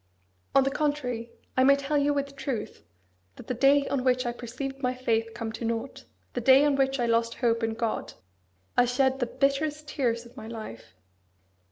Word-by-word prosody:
On 275 - +7
the 270 - 0
contrary, 255 -6 -2 0.2
I 260 - +4
may 275 +1 +7
tell 280 +2 -2
you 290 0 +3
with 280 -1 -2
truth 265 - -4 0.5
that - - -11
the 255 - -2
day 275 +3 +4
on 270 -3 -1
which 255 0 +2
I 240 - 0
perceived 260 +3 -6
my 250 -1 0
faith 230 -3 0
come 230 -1 -4
to 230 - -7
nought, 230 +3 -3 0.3
the 245 - -2
day 265 +4 +6
on 290 -1 +3
which 270 0 +1
I 240 - +2
lost 230 0 +1
hope 235 -2 +1
in 225 0 -1
God, 230 -1 -2 0.6
I 245 - +5
shed 265 +2 +1
the 245 - 0
bitterest 290 +4 0
tears 240 -5 -1
of 235 +1 -16
my 220 -3 -8
life. 215 - -9
255 Hz, 195 wpm, -27 LUFS, 235-275 Hz, 0.6 s, On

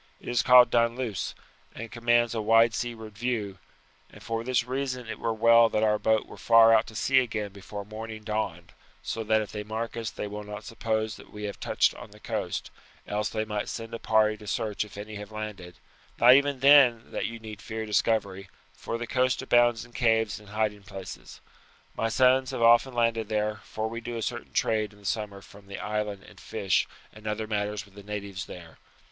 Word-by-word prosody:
It - - -15
is 120 -1 +2
called 125 -1 +7
Dunluce, 115 -2 0 0.4
and 115 0 -7
commands 120 0 +2
a 115 - -1
wide 115 +1 +5
seaward 110 -3 -5
view, 105 -5 -3 0.5
and - - -15
for 115 0 -3
this 125 -1 +1
reason 125 -1 -3
it 110 -2 -6
were 115 - -1
well 115 +1 +5
that 110 0 0
our 105 -1 +3
boat 110 -1 +2
were - - -12
far 115 -1 +6
out 110 0 +3
at 110 - -8
sea 135 0 +4
again 105 -5 -2
before 100 +1 -8
morning 110 +1 -8
dawned, 90 -6 -3 0.3
so 115 - -3
that 110 0 +2
if 105 - -10
they 105 - -4
mark 110 +2 -4
us 115 -2 -3
they - - -6
will 105 +1 -6
not 105 0 -8
suppose 110 -1 -2
that - - -14
we 105 0 -8
have 100 -1 -5
touched - - +2
on - - -11
the - - -16
coast; - - -4 0.3
else 105 0 -2
they 110 -1 -2
might 105 -1 -3
send 115 -1 -6
a 115 - -4
party 110 -1 +3
to 105 0 -13
search 105 0 -1
if 105 -1 -12
any 105 +1 -7
have 105 0 -9
landed 105 -5 -7 0.4
not 125 +1 +8
even 140 -1 +3
then 135 -5 +6
that - - -2
you 115 - -6
need 110 -2 -9
fear 110 0 -5
discovery, 100 -2 0 0.2
for 115 - -5
the 120 - -4
coast 130 +2 +1
abounds 120 -2 +3
in 120 - -19
caves 110 -3 +1
and 105 -1 -16
hiding 105 -1 -1
places. 95 -2 -10 0.5
My 115 - 0
sons 130 +2 +4
have 130 -3 -2
often 120 +2 +5
landed 115 -2 +1
there, 105 0 0
for 110 0 -3
we 115 +1 -6
do 120 0 -5
a 115 - -3
certain - - -4
trade 110 -2 0
in 105 - -19
the - - -17
summer 100 -2 -3
from 100 -1 -16
the 100 - -7
island 105 -2 -3
in - - -16
fish - - 0 0.3
and 110 0 -11
other 105 +1 -2
matters 105 -1 -2
with 100 - -21
the 100 - -11
natives 100 -2 -6
there. 85 -2 -11
110 Hz, 210 wpm, -27 LUFS, 105-115 Hz, 0.5 s, not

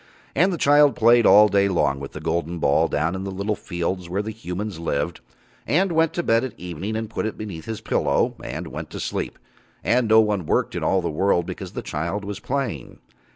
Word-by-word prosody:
And 185 +7 +3
the 175 - -2
child 145 -1 +5
played 120 0 +5
all 105 +1 +8
day 100 -1 +3
long 70 -7 +1
with 70 - -8
the - - -6
golden 85 +1 -2
ball - - +3
down 80 +4 0
in 95 0 -4
the 100 - -4
little 100 +3 -2
fields 85 -1 -4
where 100 +4 -1
the 110 - -4
humans 105 -3 -5
lived, 80 0 -2 0.5
and 185 +5 +2
went 165 -1 +3
to 175 - -2
bed 115 -3 +3
at 130 -4 -6
evening 90 +5 -5
and 110 0 -2
put 110 0 -3
it 110 - -6
beneath 90 -7 -7
his 110 -1 -5
pillow, 110 - +1
and - - -5
went - - -7
to - - -7
sleep, - - -3 0.5
and 125 -1 +2
no 110 +1 +6
one 105 -6 +1
worked - - +1
in - - -3
all 95 - +2
the 85 - -1
world 85 +1 +1
because - - -7
the - - -5
child 85 +7 -3
was 100 0 -5
playing. 125 - -3
100 Hz, 220 wpm, -23 LUFS, 85-115 Hz, 0.5 s, all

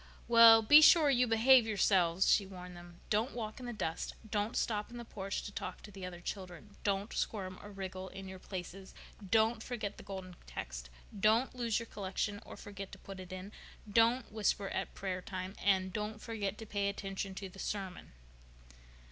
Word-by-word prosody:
"Well, 230 -1 +9
be 295 +8 +9
sure 310 -2 +7
you 250 -1 +3
behave 235 +1 +6
yourselves," 190 -4 +3
she 200 - +4
warned 180 -1 -9
them. 175 0 -13
"Don't 220 +5 +1
walk 220 -1 -5
in 250 - -7
the - - -3
dust. 165 -8 -3
Don't 210 +2 -1
stop 210 -2 -1
in 240 - -9
the 235 - -7
porch 195 -3 -4
to - - -6
talk - - -6
to 210 - -10
the 190 -2 -7
other 175 -1 -9
children. 190 +2 -7
Don't 200 +1 -1
squirm 185 -4 -3
or 205 - -10
wriggle 190 -1 -6
in 195 +1 -9
your 190 0 -8
places. 190 +1 -8 0.3
Don't 220 +3 +2
forget 220 -4 -4
the - - -10
Golden 190 -2 -7
Text. - - -6 0.3
Don't 220 +5 +3
lose 235 -3 0
your 230 - -3
collection 205 -1 -3
or - - -9
forget 200 -1 -8
to - - -8
put 195 0 -10
it 185 0 -9
in. 185 +2 -7 0.4
Don't 230 +3 +3
whisper 205 -2 0
at - - -4
prayer 185 -2 -3
time, 185 0 -5
and 190 -2 +2
don't 210 +1 -3
forget 210 -3 -3
to 225 - -8
pay 200 -1 -1
attention 195 -1 -4
to 195 - -5
the 190 +1 -13
sermon." 190 - -5
200 Hz, 190 wpm, -34 LUFS, 190-225 Hz, 0.4 s, Well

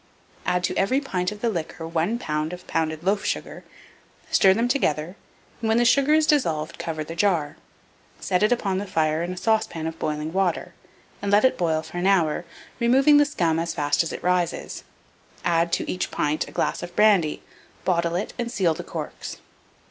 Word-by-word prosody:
Add 180 0 +1
to - - -1
every 255 +8 +2
pint 185 -10 -2
of 210 0 -9
the 235 - +1
liquor 165 -3 -4
1 170 +7 0
lb. 155 -4 -2
of 180 0 -9
pounded 160 0 -2
loaf 195 +2 +1
sugar; - - -4 0.7
stir 190 - +6
them 230 +3 +1
together, 175 - 0 0.5
and, 225 - -1
when 220 - +3
the 240 - +3
sugar 280 +5 +4
is 315 0 +4
dissolved, 165 - 0
cover 155 -2 -3
the 165 - -7
jar; 170 -5 +1 0.6
set 180 -1 0
it 210 - +3
upon 195 -6 0
the 205 - -5
fire 155 -3 +1
in 175 +1 -3
a 185 - -6
saucepan 215 -6 0
of 160 0 -5
boiling 150 +1 -3
water, 190 -2 0 0.5
and 200 - -2
let 205 +4 +5
it 260 - +3
boil 160 -2 0
for 170 +2 -6
an 180 - +1
hour, 175 -4 +2 0.3
removing 270 +5 +5
the 290 - +6
scum 170 - 0
as 165 0 -2
fast 145 +1 +1
as 165 - -3
it - - -7
rises; 180 -1 -1 0.6
add 170 0 +2
to - - 0
each 180 - -2
pint 150 +1 -1
a - - -11
glass - - -1
of 175 - -8
brandy, 195 -8 +3 0.4
bottle 170 -2 +1
it, 185 - -3
and 235 -1 -2
seal 175 -7 +2
the - - -7
corks. - - -6
180 Hz, 195 wpm, -24 LUFS, 160-210 Hz, 0.7 s, stir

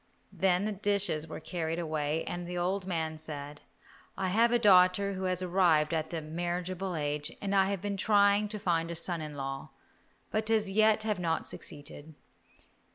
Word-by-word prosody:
Then 185 0 +2
the 215 - -1
dishes 200 -6 -1
were 160 - -7
carried 165 -1 -3
away 155 -2 -1
and 175 0 -5
the 180 0 -4
old 185 +2 -1
man 160 -3 -2
said, 145 -1 -7 0.6
"I 190 -1 -1
have 230 +5 +3
a 240 - +4
daughter 200 -2 +5
who 190 0 -4
has 185 0 0
arrived 170 -4 +3
at 160 -1 -2
a 165 -2 -3
marriageable 175 +3 -3
age, 150 0 -2
and 200 -1 -3
I 195 -1 +5
have 195 -1 -3
been 200 -1 -2
trying 205 +1 +4
to 210 - -4
find 170 -5 0
a 170 - -4
son 170 0 -1
in 150 -1 -6
law, 135 0 -5 0.6
but 215 +1 -1
as 215 -3 +2
yet 215 +1 +4
have 210 -3 -1
not 165 -2 -1
succeeded. 145 +1 -5
180 Hz, 180 wpm, -30 LUFS, 160-200 Hz, 0.6 s, daughter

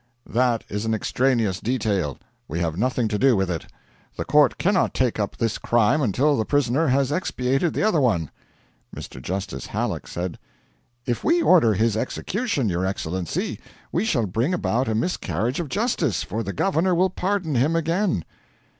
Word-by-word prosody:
'That 120 -1 +1
is 105 +1 -3
an 110 0 0
extraneous 115 -4 +1
detail; 105 - -1 0.3
we 80 +4 -3
have 85 -2 -1
nothing 120 +3 0
to 105 -1 -2
do 135 -2 +5
with 95 -2 0
it. 80 - -4 0.5
The - - -4
court 150 0 +4
cannot 190 0 +1
take 125 -4 +1
up 105 - -2
this 115 -2 -1
crime 120 +6 +2
until 140 +5 +2
the 110 - +1
prisoner 145 +4 +1
has 135 +1 +2
expiated 135 -2 0
the - - 0
other 185 -8 +3
one.' 95 - +1 0.7
Mr. 65 - -8
Justice 95 +7 -4
Halleck - - -3
said: 90 0 -4 0.7
'If 120 - -2
we 335 +2 +3
order 120 - +5
his 110 +2 +2
execution, 145 - -1
your 90 -1 -1
Excellency, 95 -2 -3 0.3
we 175 - 0
shall 135 - +1
bring 115 - 0
about 130 -6 0
a 110 - 0
miscarriage 115 - -1
of 165 -5 -3
justice, 170 - 0
for 110 +4 -3
the 100 -3 -3
governor 180 - +1
will 185 +1 +2
pardon 185 -4 -1
him 140 +6 +2
again.' 165 - 0
125 Hz, 170 wpm, -23 LUFS, 105-160 Hz, 0.7 s, do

